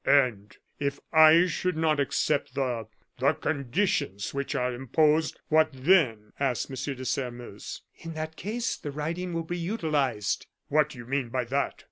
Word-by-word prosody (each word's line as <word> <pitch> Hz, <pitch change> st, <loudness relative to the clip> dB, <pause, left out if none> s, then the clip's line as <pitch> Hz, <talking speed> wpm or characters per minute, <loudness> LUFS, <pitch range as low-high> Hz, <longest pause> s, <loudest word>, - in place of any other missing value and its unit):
"And 120 Hz, -8 st, +2 dB, 0.2 s
if 140 Hz, 0 st, -1 dB
I 160 Hz, +2 st, +8 dB
should 180 Hz, 0 st, -1 dB
not 155 Hz, -2 st, +2 dB
accept 140 Hz, 0 st, 0 dB
the 125 Hz, -5 st, -1 dB, 0.3 s
the -, -, +4 dB
conditions 140 Hz, -, -1 dB
which 140 Hz, 0 st, -2 dB
are 125 Hz, 0 st, 0 dB
imposed, 150 Hz, +5 st, +2 dB
what 155 Hz, 0 st, +5 dB
then?" 130 Hz, -, +2 dB
asked 135 Hz, -2 st, 0 dB
M. 135 Hz, +1 st, -3 dB
de 130 Hz, 0 st, -7 dB
Sairmeuse. 120 Hz, -5 st, -4 dB, 0.2 s
"In 165 Hz, 0 st, -7 dB
that 155 Hz, 0 st, -4 dB
case 225 Hz, +7 st, -2 dB
the 145 Hz, -, -6 dB
writing 165 Hz, +5 st, -3 dB
will 165 Hz, -1 st, -2 dB
be 175 Hz, +2 st, -4 dB
utilized." 155 Hz, -, -1 dB, 0.2 s
"What 150 Hz, 0 st, +3 dB
do 140 Hz, -, -11 dB
you 120 Hz, -, -8 dB
mean 130 Hz, -1 st, -1 dB
by 125 Hz, +1 st, -1 dB
that?" 135 Hz, +4 st, -1 dB
140 Hz, 160 wpm, -28 LUFS, 125-160 Hz, 0.3 s, I